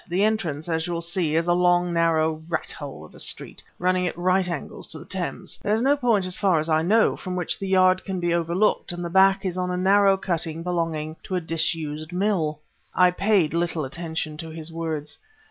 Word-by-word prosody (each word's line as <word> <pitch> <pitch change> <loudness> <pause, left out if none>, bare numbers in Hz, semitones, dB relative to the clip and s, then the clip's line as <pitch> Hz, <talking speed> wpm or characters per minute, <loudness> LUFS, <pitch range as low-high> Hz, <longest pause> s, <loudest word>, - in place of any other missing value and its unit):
The 185 +3 +1
entrance, 175 -9 -1
as 160 -1 -1
you'll 170 -1 -3
see, 170 -2 0
is 165 +1 +2
a 175 - +4
long, 175 0 +3
narrow 160 -2 +2
rat 170 - -2
hole 140 - -8
of - - -17
a - - -12
street - - -2 0.2
running 180 0 +1
at 170 - -5
right 185 +1 +2
angles 165 -5 -4
to - - -4
the - - -11
Thames. - - -4
There's 215 +3 +1
no 280 +2 +4
point, 235 -8 +1
so 185 - -3
far 185 -2 +2
as 155 +1 -1
I 155 0 +3
know, 215 +7 +3
from 185 -1 -5
which 180 -2 -1
the 195 - -4
yard 185 -1 +4
can 190 -2 -3
be 175 -1 0
overlooked; 170 +5 +1
and 175 0 -5
the 170 - -5
back 195 +1 +4
is 185 -1 -2
on 180 0 -1
a 180 - -1
narrow 195 +1 +4
cutting 165 -3 -2
belonging 165 -3 -2
to 185 - -4
a - - +2
disused 160 -1 -2
mill." 180 -5 0 0.4
I 180 0 +5
paid 195 -4 +2
little 170 -3 -1
attention 160 +1 -4
to 165 +1 -7
his 160 0 -6
words. 160 -3 -4
175 Hz, 215 wpm, -24 LUFS, 160-185 Hz, 0.4 s, I